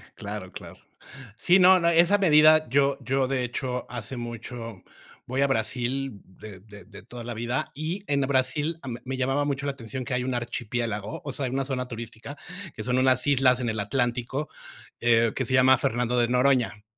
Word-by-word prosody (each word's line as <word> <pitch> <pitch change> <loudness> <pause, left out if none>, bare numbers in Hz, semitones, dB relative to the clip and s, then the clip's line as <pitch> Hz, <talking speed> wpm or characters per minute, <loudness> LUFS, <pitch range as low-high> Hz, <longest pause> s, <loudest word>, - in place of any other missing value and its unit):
Claro, 100 -2 -7
claro. - - -10 0.6
Sí, 180 +10 +4
no, 185 0 +7
no, 170 - +1
esa 170 +4 +4
medida 155 -5 +5
yo, 140 +2 +2
yo 135 0 0
de 130 -1 -1
hecho 125 0 -3
hace 120 +1 -6
mucho 115 -2 -7 0.4
voy 130 +2 -2
a 140 - +4
Brasil, 125 -1 -2
de 95 +1 -12
de 100 -1 -14
de 100 0 -13
toda 120 -1 -9
la 120 0 -6
vida, 120 +3 -2
y 165 +7 -4
en 140 -1 +1
Brasil 140 +4 0
m 120 -3 -6
me 130 +1 -3
llamaba 135 +2 0
mucho 140 -1 -2
la 140 - -1
atención 130 0 -7
que 125 - -3
hay 125 - -1
un 130 0 -2
archipiélago. 115 -3 -3
O 140 - -5
sea, 135 - -3
hay 125 - -3
una 135 +1 -1
zona 125 -2 -3
turística 120 +3 -8 0.4
que 110 - -6
son 125 +2 0
unas 130 -1 +3
islas 130 -3 +4
en 120 -2 -1
el 110 0 -2
Atlántico, 125 +5 -2 0.5
que 115 -1 +3
se 130 - -3
llama 130 0 +6
Fernando 120 +1 0
de 120 - +3
Noroña. 125 -4 +2
125 Hz, 190 wpm, -26 LUFS, 115-135 Hz, 0.6 s, no